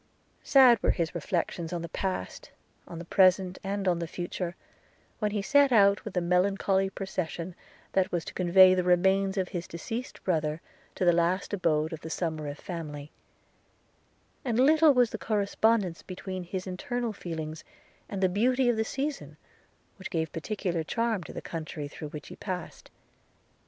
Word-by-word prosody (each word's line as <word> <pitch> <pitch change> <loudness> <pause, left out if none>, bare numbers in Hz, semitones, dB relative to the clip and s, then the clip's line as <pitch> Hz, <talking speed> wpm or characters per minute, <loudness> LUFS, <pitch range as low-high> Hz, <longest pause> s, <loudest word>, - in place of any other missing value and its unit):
Sad 255 -5 +6
were - - +1
his 165 -2 0
reflections 170 -1 -2
on 175 -2 -3
the - - -4
past, 185 - -4 0.4
on 170 - -8
the 170 - -7
present, 185 0 +3
and 195 0 -2
on 175 -2 +2
the 170 - -3
future, 175 +1 -4 0.6
when 210 - +1
he 205 -1 -2
set 285 +5 +4
out 200 -3 +5
with 215 - -7
the 180 - +2
melancholy 190 +2 +2
procession 185 -2 -4 0.4
that 190 -1 +1
was 170 -2 -2
to - - -7
convey 185 +1 +6
the 185 -1 +1
remains 190 +2 +3
of 185 -1 0
his 175 -1 -5
deceased 225 +9 -6
brother 155 -3 0 0.4
to 185 - 0
the 175 - +6
last 175 +4 0
abode 160 -4 +1
of 160 - -7
the 160 - -7
Somerive 155 -3 -3
family; 150 -5 -7 1.3
and 240 -4 0
little 305 +2 +6
was 245 -2 +4
the - - -5
correspondence 205 -3 +1
between 185 0 -6
his 185 +1 -4
internal 230 +5 -3
feelings 160 -4 -6 0.5
and 195 -1 -3
the - - +6
beauty 245 +7 +2
of 235 - +1
the 220 - +2
season, 275 +5 -4 0.6
which 190 - -7
gave 160 -3 -2
peculiar 175 -1 -2
charms 225 +1 -1
to - - -9
the - - -7
country 155 -2 -5
through 150 +1 -8
which 150 -1 -9
he - - -9
passed. 185 -3 -6
185 Hz, 165 wpm, -28 LUFS, 170-205 Hz, 1.3 s, Sad